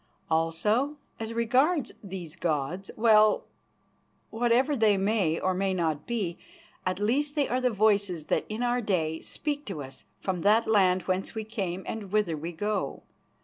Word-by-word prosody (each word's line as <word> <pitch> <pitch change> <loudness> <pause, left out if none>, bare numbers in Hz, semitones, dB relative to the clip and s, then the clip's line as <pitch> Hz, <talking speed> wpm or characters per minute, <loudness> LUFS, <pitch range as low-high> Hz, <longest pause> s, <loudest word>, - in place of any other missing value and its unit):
Also, 210 - +1 0.2
as 225 0 -4
regards 255 +7 +2
these 180 -5 -7
gods 170 +2 -2
well, 215 -2 +5 0.9
whatever 245 +5 +2
they 215 -5 +4
may 195 -5 +1
or 185 - +1
may 190 0 0
not 160 -4 -1
be, 205 -8 -2 0.5
at 185 0 0
least 275 +9 0
they 290 -2 +2
are 255 +2 0
the 250 - +3
voices 200 -6 +1
that - - +1
in 215 +3 -3
our 245 0 +1
day 160 -7 0
speak 295 -1 -3
to 165 -8 -5
us 135 0 -10
from 185 -3 -2
that 215 +4 +4
land 185 -4 +3
whence 185 +4 -2
we 220 - -2
came 195 -5 -4
and 210 -4 -5
whither 210 -6 +1
we 160 +3 -5
go. 205 +4 -2
205 Hz, 160 wpm, -28 LUFS, 180-230 Hz, 0.9 s, well